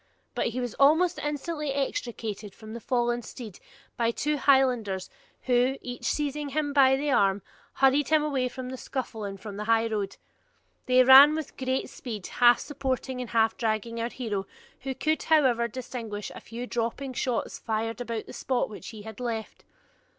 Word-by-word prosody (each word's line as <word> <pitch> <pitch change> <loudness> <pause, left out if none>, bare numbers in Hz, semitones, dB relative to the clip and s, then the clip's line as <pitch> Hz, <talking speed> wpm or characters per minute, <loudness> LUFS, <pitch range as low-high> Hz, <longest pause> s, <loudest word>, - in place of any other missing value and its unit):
But - - 0
he 240 +2 -3
was 245 -3 -3
almost 320 +6 +4
instantly 300 0 -3
extricated 225 - -3
from 220 0 -10
the 235 - -6
fallen 240 -1 0
steed 220 -4 -9 0.4
by 230 -1 +2
two 295 +6 -1
Highlanders, 250 -9 +2 0.3
who, 255 +1 +2
each 245 -1 -7
seizing 295 0 -1
him 290 0 -1
by 265 -2 +6
the 285 +2 -1
arm, 200 -5 +2 0.3
hurried 270 +1 +3
him 310 -1 +4
away 270 -4 0
from 255 0 -7
the 260 - -6
scuffle 235 -5 -5
and 195 -1 -5
from 205 0 -8
the 210 - -4
highroad. 225 -3 0 0.7
They 255 0 +6
ran 270 +4 +9
with 315 -3 -5
great 260 0 -1
speed, 215 -7 -7
half 240 -1 +5
supporting 260 -2 -3
and 245 - -6
half 225 -1 +2
dragging 230 0 -1
our 230 - -1
hero, 210 -7 -4 0.3
who 265 0 -4
could, 310 +3 0
however, 260 -7 +3
distinguish 230 -3 -6
a - - -9
few 235 +2 -7
dropping 245 +3 -3
shots 245 -2 -2
fired 225 +1 -2
about 230 -2 -4
the - - -11
spot 255 -4 -1
which 210 - -9
he 215 -2 -9
had 220 +1 -9
left. 230 -3 -4
245 Hz, 170 wpm, -27 LUFS, 225-270 Hz, 0.7 s, ran